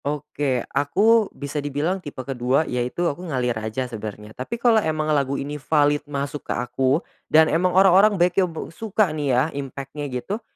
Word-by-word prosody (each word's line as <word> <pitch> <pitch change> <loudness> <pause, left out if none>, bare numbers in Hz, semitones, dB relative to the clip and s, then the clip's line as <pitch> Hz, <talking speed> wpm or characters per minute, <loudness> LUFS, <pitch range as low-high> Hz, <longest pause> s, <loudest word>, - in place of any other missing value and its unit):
Oke. 145 -3 -2
Aku 210 +9 +3
bisa 145 +1 -5
dibilang 145 +7 -2
tipe 145 - -10
ke-2 130 +3 +1
yaitu 125 +7 -2
aku 170 0 -2
ngalir 125 -4 0
aja 110 +4 -3
sebenarnya 110 -2 -7
tapi 130 - -5
kalau 235 -2 +4
emang 155 -3 0
lagu 140 -1 0
ini 145 +1 -5
valid 145 0 +2
masuk 140 0 -3
ke - - +1
aku 130 +5 0 0.2
dan 160 +1 +6
emang 180 +3 +3
orang-orang 195 +2 +6
bekyo 180 +1 +2
be 160 0 -7
suka 210 -5 0
nih 150 -2 -2
ya 125 0 +3
impact-nya 140 +1 -6
gitu, 160 - -4
145 Hz, 170 wpm, -23 LUFS, 130-175 Hz, 0.2 s, dan